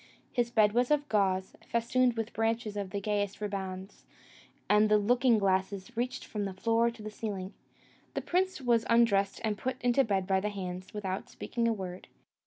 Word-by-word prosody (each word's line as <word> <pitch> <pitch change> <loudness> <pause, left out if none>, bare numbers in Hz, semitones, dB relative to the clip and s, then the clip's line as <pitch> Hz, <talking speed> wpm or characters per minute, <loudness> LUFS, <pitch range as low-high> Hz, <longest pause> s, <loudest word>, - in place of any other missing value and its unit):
His 240 -1 0
bed 215 -3 +4
was 245 +3 +2
of 295 -1 +2
gauze, 190 -3 +1
festooned 235 +1 +2
with 225 0 -3
bunches 225 -1 -1
of 200 -2 -3
the 200 - -3
gayest 205 -1 -1
ribands, 195 -2 -5 0.6
and 210 +1 +4
the 210 - +6
looking 240 +3 +3
glasses 195 +2 0
reached 250 +2 -2
from 210 -2 -3
the 195 -1 -5
floor 230 +4 +2
to 230 -2 -10
the 215 - -6
ceiling. 205 -3 -5 0.6
The - - -1
prince 370 0 0
was 235 -3 +3
undressed 205 -4 +3
and 210 -2 -1
put 255 +3 -3
into 245 +2 +3
bed 195 -5 0
by 190 0 +2
the 210 +2 -1
hands, 185 -2 -6
without 195 -2 -4
speaking 235 -1 -2
a - - +3
word. 185 -4 -5
210 Hz, 185 wpm, -30 LUFS, 195-235 Hz, 0.6 s, the